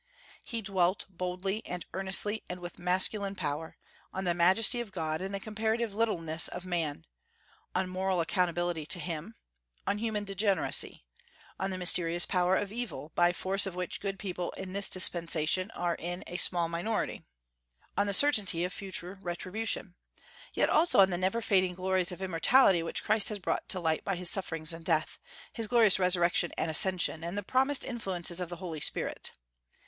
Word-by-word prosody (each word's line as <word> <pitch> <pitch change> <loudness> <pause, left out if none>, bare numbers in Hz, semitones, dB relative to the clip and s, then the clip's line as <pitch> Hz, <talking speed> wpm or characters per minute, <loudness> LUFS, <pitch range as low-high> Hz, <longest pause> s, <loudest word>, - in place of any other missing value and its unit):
He 230 -3 -5
dwelt, 190 -2 +1
boldly 185 +4 -4
and 180 -1 -6
earnestly, 195 +3 +2
and 180 - -5
with 175 -1 -9
masculine 190 +3 +2
power, 155 -2 -4 0.3
on 190 - -4
the 175 -2 +1
majesty 190 +8 +4
of 225 -4 -8
God 160 -3 -3
and 190 +1 -4
the 200 - -3
comparative 220 +1 -2
littleness 170 -7 +2
of 180 +1 -6
man, 165 - -3 0.7
on 185 0 0
moral 185 0 -1
accountability 175 -2 -1
to 180 - +1
Him, 170 +6 -6 0.5
on 205 - -1
human 220 -2 -2
degeneracy, 195 - +1 0.6
on 190 +1 -1
the 185 - -4
mysterious 175 -1 +3
power 180 0 +1
of 205 0 -2
evil, 210 - -6
by 175 0 +3
force 195 +3 +1
of 185 - -6
which 180 -1 -4
good 195 -1 -4
people 180 -2 -4
in 190 -1 -8
this 200 0 +3
dispensation 175 0 +3
are 175 -1 -1
in 175 +2 -5
a 175 - -6
small 175 -2 +2
minority, 175 +7 -3 0.7
on 205 - +1
the 200 - -1
certainty 205 -12 +5
of 180 +1 -3
future 190 -1 -6
retribution; 185 +2 -2 0.6
yet - - +2
also 330 +3 +3
on 190 -1 +6
the - - 0
never 190 +5 0
fading 185 -3 +1
glories 185 0 +1
of 180 +2 -7
immortality 185 +2 +4
which 165 - -3
Christ 215 -1 +2
has 210 - -4
brought 185 - -3
to 185 - +2
light 160 -2 -1
by 195 - -2
his 175 0 -1
sufferings 165 -4 +1
and 165 0 -10
death, 160 -2 -1 0.3
his 225 -2 -3
glorious 225 -5 +5
resurrection 175 -2 +2
and 160 - -1
ascension, 170 -1 +2
and 170 +4 -5
the 205 - -3
promised 265 +6 +1
influences 185 -8 -3
of 180 -2 -4
the 175 - -6
Holy 170 -4 -6
Spirit. - - -1
185 Hz, 175 wpm, -30 LUFS, 175-200 Hz, 0.7 s, on